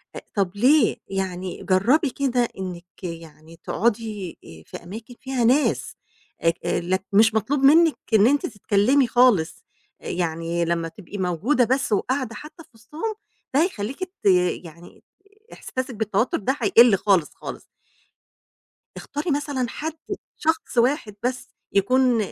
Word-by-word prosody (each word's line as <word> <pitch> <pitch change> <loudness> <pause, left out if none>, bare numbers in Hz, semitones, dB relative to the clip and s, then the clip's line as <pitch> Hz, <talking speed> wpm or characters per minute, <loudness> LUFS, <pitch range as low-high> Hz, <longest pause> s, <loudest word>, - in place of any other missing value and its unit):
آآ - - -6
طب 195 -3 +1
ليه؟ 255 +3 +4
يعني 190 -2 -4
جربي 245 - +3
كده 250 -3 0
إنِك 180 0 -8
يعني 165 -1 -9
تقعدِي 215 -4 -2
آآ 80 -1 -13
في - - -9
أماكن 220 +7 -9
فيها 260 -2 -2
ناس، 265 +6 +2 0.5
اك 165 +1 +2
آآ - - +1
لك 185 +2 -1
مش 220 +2 +5
مطلوب 240 +7 0
منِك 310 +4 +5 0.2
إن 215 0 +6
أنتِ 285 +2 +2
تتكلمي 225 +5 +2
خالص، 235 -9 +3 0.4
يعني 170 0 -2
لمّا 170 0 -1
تبقي 200 +3 -10
موجودة 190 - +1
بس، 260 +1 0
وقاعدة 250 +3 -1
حتى 315 +3 -11
في - - -26
وسطهم، 300 - -6 0.4
ده 285 +4 +4
هيخليكِ 270 - -3
ت 370 +1 -11 0.4
يعني 170 +1 -14 0.5
إحساسِك 255 -1 -5
بالتوتر 215 +2 0
ده 265 +7 -1
هيقِل 235 -3 +6
خالص، 185 -6 +2
خالص. - - -8 1.4
اختاري 295 +3 -4
مثلًا 285 -3 -1
حد، 315 +5 -4 0.4
شخص 320 -4 -1
واحد 235 -3 +1
بس، 255 0 -2 0.2
يكون 250 +5 +3
225 Hz, 135 wpm, -23 LUFS, 185-265 Hz, 1.4 s, إن